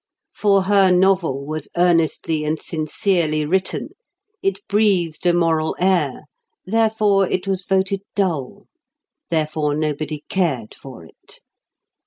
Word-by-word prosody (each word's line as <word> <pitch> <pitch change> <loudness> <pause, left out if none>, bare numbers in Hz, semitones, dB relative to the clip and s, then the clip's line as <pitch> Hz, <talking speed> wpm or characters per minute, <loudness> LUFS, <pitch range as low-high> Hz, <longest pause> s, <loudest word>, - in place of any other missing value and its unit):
For 200 -2 +2
her 195 -1 +4
novel 180 -7 +2
was 155 0 -5
earnestly 165 -2 +1
and 155 +1 -1
sincerely 155 -1 -1
written; 185 +4 -1 0.5
it 390 +1 -2
breathed 185 -6 +1
a - - +6
moral 165 -2 +1
air, 175 -8 +1 0.4
therefore 215 -2 +2
it 185 - -2
was 190 -1 -1
voted 190 +1 0
dull; 170 -10 -2 0.6
therefore 155 -2 0
nobody 155 0 -3
cared 145 - -1
for 125 -11 -12
it. - - -17
170 Hz, 115 wpm, -20 LUFS, 155-190 Hz, 0.6 s, a